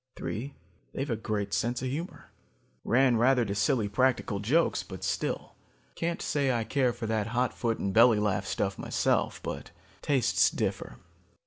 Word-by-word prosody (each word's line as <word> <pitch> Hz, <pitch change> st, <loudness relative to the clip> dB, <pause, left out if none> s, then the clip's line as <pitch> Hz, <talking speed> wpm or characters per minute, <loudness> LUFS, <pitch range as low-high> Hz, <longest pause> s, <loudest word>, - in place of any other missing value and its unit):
"Three, 135 Hz, +6 st, -5 dB, 0.4 s
they've 135 Hz, 0 st, -3 dB
a -, -, +1 dB
great 105 Hz, -2 st, -3 dB
sense 120 Hz, +2 st, -1 dB
of -, -, -1 dB
humor. 160 Hz, +7 st, -6 dB, 0.5 s
Ran 125 Hz, -1 st, +3 dB
rather 125 Hz, +1 st, +3 dB
to 100 Hz, -, -2 dB
silly 105 Hz, +2 st, +1 dB
practical 120 Hz, -2 st, +1 dB
jokes, 140 Hz, +12 st, +2 dB
but -, -, -9 dB
still. -, -, -2 dB, 0.4 s
Can't 170 Hz, +1 st, -3 dB
say 140 Hz, -2 st, +1 dB
I 120 Hz, -2 st, 0 dB
care 130 Hz, +1 st, +1 dB
for 120 Hz, -1 st, -6 dB
that 110 Hz, -1 st, -1 dB
hot 120 Hz, +2 st, 0 dB
foot 115 Hz, -2 st, -1 dB
and 100 Hz, -, -2 dB
belly 115 Hz, 0 st, +6 dB
laugh 95 Hz, -2 st, 0 dB
stuff 95 Hz, -1 st, -2 dB
myself, -, -, 0 dB
but -, -, -5 dB, 0.3 s
tastes 135 Hz, -5 st, +3 dB
differ. -, -, -3 dB
120 Hz, 160 wpm, -29 LUFS, 105-130 Hz, 0.5 s, belly